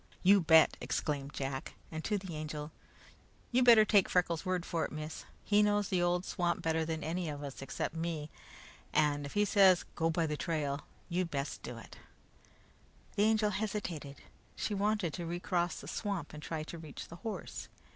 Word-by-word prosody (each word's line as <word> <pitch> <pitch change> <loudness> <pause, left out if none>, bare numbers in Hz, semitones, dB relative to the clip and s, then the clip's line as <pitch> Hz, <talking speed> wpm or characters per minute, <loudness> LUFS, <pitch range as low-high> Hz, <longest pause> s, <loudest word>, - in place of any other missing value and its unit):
"You 195 +1 +7
bet!" 160 -1 +6
exclaimed 145 -2 -2
Jack. 135 -1 -4 0.2
And 160 0 -4
to 210 - +1
the 190 -4 -6
Angel: 150 0 -5 0.8
"You 250 +1 +4
better 230 -3 +8
take 205 -3 +4
Freckles' 170 -3 +1
word 185 -2 -1
for 165 -1 -1
it, - - -3
miss. 155 +1 -6 0.2
He 205 0 +4
knows 205 -1 +2
the 180 -2 +2
old 175 +1 +1
swamp 175 -2 -1
better 160 0 +1
than 160 0 -3
any 170 +1 -2
of 145 -1 -5
us, 140 -2 -7
except 135 - -3
me, 160 -2 -3 0.6
and 145 -2 +2
if - - -10
he 205 0 +3
says 190 -3 +5
'go 165 0 +1
by 165 0 +1
the 150 -1 -1
trail,' 150 -3 -1 0.3
you'd 180 -1 -1
best 140 -2 -3
do - - -7
it." - - -12 1.2
The 205 0 +4
Angel 215 -1 +3
hesitated. 190 -9 -4 0.3
She 210 - -2
wanted 205 -4 +1
to 175 - -4
recross 175 0 -1
the - - -10
swamp 195 -7 -3
and 150 - -8
try 155 0 -3
to 165 +2 -8
reach 155 -3 -8
the 170 - -9
horse. 225 +3 -6
170 Hz, 185 wpm, -33 LUFS, 155-195 Hz, 1.2 s, better